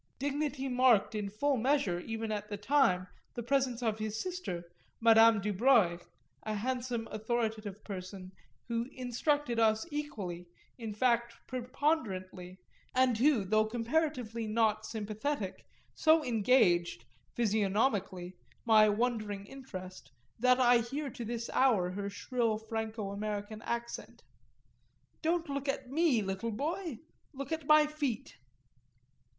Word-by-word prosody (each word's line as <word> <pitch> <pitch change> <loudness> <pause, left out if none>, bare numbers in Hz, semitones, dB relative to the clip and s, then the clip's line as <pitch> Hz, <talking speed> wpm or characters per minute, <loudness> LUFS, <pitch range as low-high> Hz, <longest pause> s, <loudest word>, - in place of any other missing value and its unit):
Dignity 285 0 -2
marked 250 -5 +4
in 210 -2 -2
full 270 +7 0
measure 240 -8 +1
even 225 +3 -4
at 210 -1 -4
the 205 - -4
time 205 -5 +3 0.3
the 240 - -4
presence 255 -1 0
of 220 -1 0
his 215 0 -3
sister 360 - -4 0.4
Madame 225 -1 +6
Dubreuil, 205 -3 +3 0.4
a 215 -1 -3
handsome 245 +1 -2
authoritative 220 -2 -2
person 185 -1 -7 0.4
who 235 +1 -2
instructed 255 0 0
us 220 -1 +3
equally, 195 -13 -5 0.3
in 220 -3 -5
fact 235 0 +1
preponderantly, 235 - -2 0.4
and 255 -3 +3
who, 255 -6 +3
though 215 +2 +2
comparatively 240 -1 -1
not 215 -1 +1
sympathetic, 215 0 -4 0.3
so 315 -1 +4
engaged, 185 - +3 0.3
physiognomically, 200 -4 0 0.3
my 215 -2 +6
wondering 210 -2 -1
interest, 190 -8 -9 0.3
that 250 +2 +4
I 245 -1 +6
hear 270 +4 -4
to 235 - -7
this 230 0 -4
hour 210 -9 +3
her 200 +1 -4
shrill 230 +1 -1
Franco 220 -2 -4
American 210 +1 -4
accent: 235 0 -5 1.0
"Don't 335 +1 0
look 280 0 -3
at 270 -2 -3
me, 290 -7 +3
little 195 +4 -3
boy 310 - -3 0.4
look 275 +1 -6
at 320 -3 -3
my 305 0 +7
feet." 295 -7 -3
230 Hz, 125 wpm, -32 LUFS, 210-260 Hz, 1.0 s, my